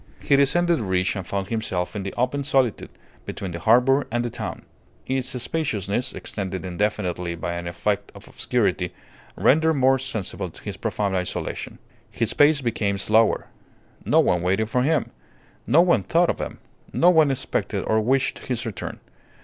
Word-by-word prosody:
He 140 - +4
descended 170 +5 +3
the - - -3
ridge 95 -1 0
and 95 -2 -5
found 100 0 -3
himself 110 -5 -2
in 105 - -2
the 95 0 -4
open 130 +4 0
solitude, 135 -5 +1 0.3
between 95 -2 -6
the 85 - -5
harbour 125 - +4
and 120 +1 0
the 120 - -3
town. 115 -2 -5 0.4
Its 130 -1 -1
spaciousness, 120 - -1
extended 95 -2 -4
indefinitely 90 -2 -2
by 85 +1 -4
an 85 0 -5
effect 100 +4 -2
of - - -13
obscurity, - - -1 0.4
rendered 160 +3 +3
more 135 -1 +3
sensible 125 -7 -4
his - - -5
profound 100 -2 -1
isolation. 90 -1 -3 0.3
His 115 -1 -1
pace 145 0 +4
became 110 -5 -1
slower. 110 +3 +2 0.5
No - - +3
one 90 - +1
waited 95 +5 0
for 125 - +2
him; 150 +1 +1 0.6
no 150 +8 +6
one 170 - +3
thought 170 - +2
of - - -8
him; - - -5 0.3
no 175 +2 +5
one 160 -4 +5
expected 130 -1 -2
or 110 0 +2
wished 130 +4 +1
his 125 -2 -2
return. 110 -6 -5
115 Hz, 165 wpm, -23 LUFS, 95-135 Hz, 0.6 s, no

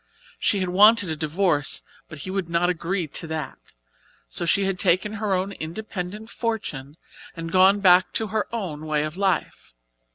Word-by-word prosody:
She 200 - +1
had 185 - -1
wanted 205 0 +5
a - - -2
divorce, 155 -1 +1 0.3
but 155 - -9
he 185 - -4
would 190 -3 -3
not 170 +1 +2
agree 180 +1 -2
to 160 +2 -3
that, 155 -2 -5 0.7
so 175 - -4
she 195 +4 +2
had 190 -1 -2
taken 185 +4 +2
her 205 -3 +1
own 185 +2 -2
independent 200 +4 -6
fortune 165 - -4 0.4
and 165 0 -5
gone 190 +3 +5
back 185 -1 +5
to 220 - -1
her 215 -1 0
own 165 -9 -5
way 150 -1 0
of 155 +1 -5
life. 190 - -2
180 Hz, 170 wpm, -24 LUFS, 160-200 Hz, 0.7 s, wanted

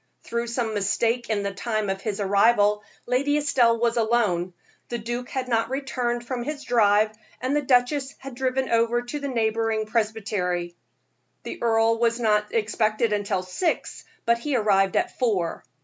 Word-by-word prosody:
Through 235 0 -3
some 235 -2 -2
mistake 225 +4 0
in 210 -2 0
the 200 0 -3
time 215 +1 -2
of 195 0 -2
his 210 0 -3
arrival, 205 +1 +3 0.2
Lady 280 +4 +1
Estelle 245 -6 +3
was 235 0 +1
alone; 215 -6 +1 0.4
the 240 - -2
duke 240 +2 -5
had 260 -1 -3
not 230 -1 +1
returned 250 -3 -2
from 245 0 -3
his 290 +3 -5
drive, 215 -2 +3 0.3
and 260 +3 -1
the 295 - +2
duchess 265 +1 +1
had 270 0 -9
driven 260 +1 -1
over 230 +1 +2
to 265 +5 -5
the 280 - -4
neighboring 225 -3 0
presbytery. 205 -6 -1 0.7
The - - -7
earl 225 0 +3
was 235 0 +1
not 210 -2 +1
expected 215 0 +1
until 200 -3 -1
six, 255 - -2 0.2
but 235 0 +3
he 290 +2 -2
arrived 195 -4 +2
at - - -1
four. 200 -10 0
230 Hz, 165 wpm, -25 LUFS, 210-245 Hz, 0.7 s, arrival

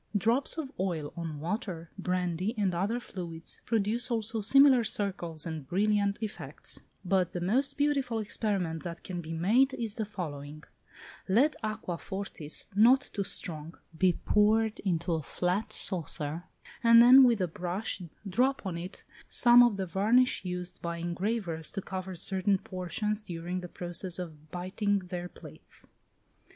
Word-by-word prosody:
Drops 230 - +1
of 290 -4 -4
oil 170 -6 -2
on 165 -4 -5
water, 175 - -4
brandy, 180 +2 -1
and 195 -3 +1
other 200 +8 0
fluids, 170 -8 -8
produce 230 +2 0
also 225 -1 0
similar 265 +3 +6
circles 185 -7 -2
and 160 -5 -5
brilliant 200 +2 +1
effects: 215 - -4 0.2
but 185 -1 +1
the 175 - -2
most 255 +11 +1
beautiful 280 -5 +1
experiment 200 -6 -1
that 170 -1 -7
can 180 -2 -5
be 160 -1 -8
made 225 +12 +3
is 225 -3 -3
the 220 - -1
following: 155 -6 -7 0.7
Let 255 +11 +4
aqua 215 -6 -4
fortis, 190 -6 -5
not 245 +7 +5
too 200 - -1
strong, 165 -4 -4 0.2
be 180 +2 +3
poured 215 +4 +2
into 175 -2 -1
a 160 - 0
flat 180 +7 -1
saucer, 160 -2 -3 0.4
and 230 0 +8
then 255 +3 +9
with 240 -4 +4
a 185 - +1
brush 180 +5 -2 0.3
drop 250 +6 +1
on 175 -3 -3
it 180 +3 -8 0.2
some 240 0 +7
of 240 -4 +4
the 190 - -1
varnish 215 +9 +3
used 180 -1 -4
by 170 0 -3
engravers 175 -1 -2
to 195 - -4
cover 190 -1 -5
certain 190 +3 +1
portions 190 +4 -3
during 175 -1 -4
the 180 -1 -8
process 175 +1 -3
of 155 -4 -8
biting 190 +4 -1
their 180 -2 -5
plates. - - -8
190 Hz, 150 wpm, -30 LUFS, 175-220 Hz, 0.7 s, then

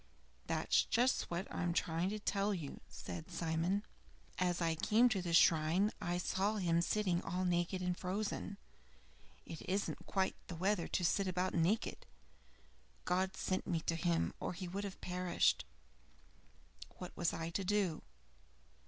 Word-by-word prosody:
"That's - - +3
just 250 +2 +2
what 175 +3 -2
I - - -2
am 175 -1 +1
trying 170 +2 0
to 215 - -2
tell 205 -1 0
you," 155 -6 -6
said 85 -2 -7
Simon. 170 +5 0 0.6
"As 180 -1 +1
I 165 -2 +2
came 220 +9 +4
to 200 -5 0
the 175 -1 -3
shrine 165 +4 +5
I 175 0 0
saw 195 +4 0
him 170 -4 +2
sitting 180 -1 +1
all 180 +2 -2
naked 175 +1 0
and 180 0 0
frozen. 200 +2 -3 0.9
It 160 - -7
isn't 195 +2 -1
quite 190 -1 +1
the 180 - -5
weather 185 +1 +1
to 180 - 0
sit 195 +3 +2
about 185 0 0
naked! 175 +7 0 1.0
God 190 +1 +1
sent 185 - -1
me 165 -3 0
to 165 - -1
him, 170 0 +1
or - - -3
he 180 +1 -5
would 195 +3 -3
have 195 - -7
perished. 180 -1 +1 1.3
What 180 - -8
was 170 - +1
I 165 0 -4
to 195 - -1
do? 190 -4 +1
180 Hz, 155 wpm, -36 LUFS, 170-195 Hz, 1.3 s, shrine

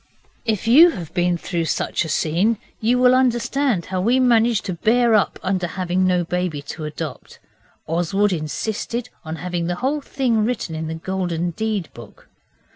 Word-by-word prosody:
If 220 -1 -1
you 310 +9 +8
have 175 - -7
been 175 -1 +1
through 170 -1 -2
such - - -1
a - - -6
scene 180 +11 +1 0.2
you 235 +3 +2
will 250 0 +5
understand 255 -4 +1
how 185 - 0
we 240 +6 +3
managed 235 -3 +3
to 190 - -2
bear 230 +6 +2
up 210 -2 +2
under 185 -2 0
having 185 +1 0
no 180 -1 +2
baby 175 -4 -2
to 155 - -6
adopt. 150 -2 -7 0.5
Oswald 185 +5 +1
insisted 215 - -3
on 160 -1 -5
having 175 0 -3
the 175 - -1
whole 275 +8 -1
thing 245 -6 0
written 215 -7 -2
in 160 0 -4
the 160 - -4
Golden 175 0 -2
Deed 215 -3 -2
book. 115 -4 -14
185 Hz, 170 wpm, -21 LUFS, 170-230 Hz, 0.5 s, you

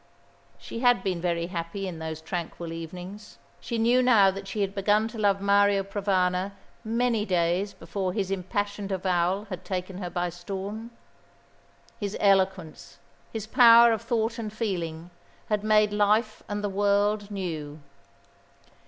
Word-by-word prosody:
She 230 - -7
had 245 -5 +3
been 180 -3 -2
very 170 -1 0
happy 175 +2 -4
in 170 -3 -6
those 160 -1 -5
tranquil 170 0 -5
evenings. 180 +5 -9 0.2
She 235 - -4
knew 240 +3 +4
now 220 -6 +5
that 195 +1 -8
she 210 - -3
had 195 -1 -1
begun 210 +2 +2
to 225 - -8
love 200 -2 +2
Mario 200 0 +3
Provana 190 -1 0 0.3
many 230 -1 0
days 180 +1 0
before 185 +3 -3
his 195 -1 -2
impassioned 200 +1 -3
avowal 185 +1 0
had 185 0 -5
taken 185 0 -4
her 180 -3 -4
by 175 +1 -2
storm. 195 +6 -6 1.1
His 205 -1 -3
eloquence, 190 -5 +1 0.3
his 220 -2 -5
power 235 0 +7
of 220 - -2
thought 230 0 -1
and 215 -2 -4
feeling, 175 -6 -4 0.4
had 210 -1 0
made 215 -1 +3
life 210 +2 +2
and 205 0 -3
the - - +1
world 205 +1 +1
new. 160 -7 -5
195 Hz, 145 wpm, -26 LUFS, 180-210 Hz, 1.1 s, power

